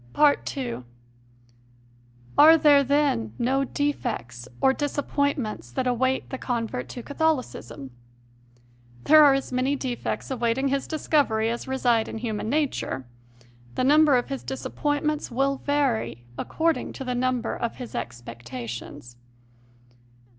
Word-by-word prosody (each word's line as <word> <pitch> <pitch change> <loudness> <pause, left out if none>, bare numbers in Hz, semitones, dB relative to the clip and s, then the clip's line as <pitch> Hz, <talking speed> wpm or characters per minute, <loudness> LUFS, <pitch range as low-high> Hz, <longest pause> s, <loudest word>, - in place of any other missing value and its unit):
2. 245 - -4 1.5
Are 320 +2 +8
there, 295 -2 +6
then, 275 - +1
no 265 +3 +1
defects 225 - -3
or 265 - +4
disappoint 285 0 -1
ments 215 - -5
that 255 - -2
await 260 +1 0
the 265 - -4
convert 230 - -3
to 245 - -7
Catholicism? 285 - -2 1.1
There 310 0 +7
are 280 -2 +6
as 275 - -3
many 255 +3 +1
defects 260 0 -4
awaiting 245 +2 0
his 275 0 -1
discovery 275 -8 +1
as 235 - -5
reside 245 -4 +1
in - - -6
human 220 -2 -3
nature; 275 - -1 0.7
the - - 0
number 295 0 +5
of 245 - -2
his 275 -1 -4
dis 265 - -6
appointments 295 +1 -1
will 275 +3 0
vary 235 - -1
according 325 - -1
to 270 - -6
the 250 -1 -2
number 250 0 -1
of 235 - -3
his 250 -3 -8
expectations. 120 0 -7
255 Hz, 125 wpm, -25 LUFS, 225-285 Hz, 1.5 s, Are